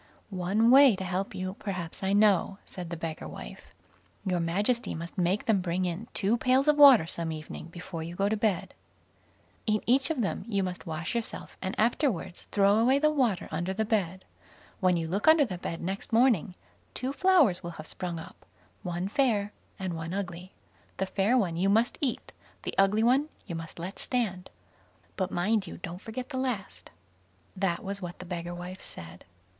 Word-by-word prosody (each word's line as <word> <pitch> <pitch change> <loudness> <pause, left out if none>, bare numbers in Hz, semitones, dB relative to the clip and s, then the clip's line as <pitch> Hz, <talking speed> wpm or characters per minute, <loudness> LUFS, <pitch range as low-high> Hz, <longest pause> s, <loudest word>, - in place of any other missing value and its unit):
"One 195 +5 +2
way 270 -4 +8
to 190 - -5
help 185 +2 -2
you 185 0 -3
perhaps 180 -5 -5
I 190 0 0
know", 200 -2 +3
said 180 -3 -7
the 170 - -4
beggar 160 -1 -5
wife. - - -9 0.6
"Your 180 -2 +1
Majesty 205 +9 0
must 170 +1 -7
make 185 +3 +1
them 210 -4 +3
bring 180 +1 -1
in 180 +6 -3
two 210 +3 +2
pails 260 +4 +3
of 300 - +6
water 275 - +9
some 165 0 -3
evening 155 +1 -7
before 170 0 -7
you 170 +2 -6
go 195 +2 +1
to 215 - +1
bed. 210 -4 0 0.9
In 215 -1 +1
each 265 +5 +3
of 305 -6 0
them 200 - -2
you 200 -4 0
must 180 0 -5
wash 165 +1 -3
yourself, 235 -1 -4
and 190 - -3
afterwards 215 - 0
throw 200 0 +4
away 255 +4 +4
the 305 +1 +3
water 250 -10 +1
under 175 +4 -2
the 220 +2 0
bed. 190 -4 -1 0.5
When 180 -2 +3
you 165 -1 -2
look 195 - -2
under 315 -2 +7
the 185 -7 -6
bed 165 - -4
next 190 +6 -4
morning, 225 - +3 0.4
two 260 +2 -3
flowers 315 - +4
will 170 - -5
have 155 - -8
sprung 175 +1 -5
up, 165 - -12 0.4
one 175 +1 -3
fair 210 -3 +1 0.2
and 190 -3 -3
one 165 +2 -4
ugly. 185 -1 -5 0.5
The 190 - 0
fair 200 +6 +2
one 175 -8 0
you 190 +3 +2
must 225 +4 +2
eat, 270 -5 -2 0.3
the - - -3
ugly 195 +3 +3
one 265 +6 +3 0.2
you 180 - -6
must 165 -1 -7
let 175 +4 -6
stand; 200 -8 -2 0.7
but 185 -2 -1
mind 200 +3 0
you - - -8
don't 175 +2 -7
forget 245 +4 -6
the 265 - -4
last." 250 -7 -4 0.7
That 185 -3 -1
was 200 +1 -4
what 175 0 -6
the 180 - -9
beggar 175 -1 -5
wife 180 +2 -7
said. 85 +1 -10
195 Hz, 190 wpm, -29 LUFS, 175-225 Hz, 0.9 s, water